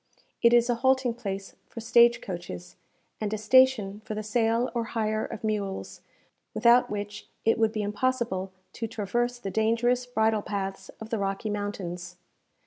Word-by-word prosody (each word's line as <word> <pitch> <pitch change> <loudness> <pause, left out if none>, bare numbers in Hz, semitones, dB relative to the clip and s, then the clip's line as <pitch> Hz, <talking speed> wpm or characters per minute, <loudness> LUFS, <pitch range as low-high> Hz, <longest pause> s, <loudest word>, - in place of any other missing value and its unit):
It 235 - +6
is 240 0 +5
a 245 - +2
halting 260 -2 +3
place 195 -4 -6
for - - -8
stage 235 +1 +5
coaches, 90 - -7 0.5
and 210 -1 -1
a 215 - -1
station 215 -3 +4
for 215 - -5
the 215 - -3
sale 230 +2 +1
or 235 -1 0
hire 215 0 0
of 215 - -7
mules, 205 -3 -3 0.5
without 240 +1 +5
which 205 0 -5 0.2
it 225 0 +3
would 220 -1 +3
be 215 -1 -2
impossible 210 -3 -1 0.2
to 230 - -4
traverse 240 +3 -1
the 200 -5 -5
dangerous 235 +3 +1
bridle 220 -3 +1
paths 195 -1 -4
of 220 0 -9
the 225 - 0
Rocky 195 +2 -2
Mountains. 180 -4 -5
220 Hz, 160 wpm, -27 LUFS, 200-235 Hz, 0.5 s, It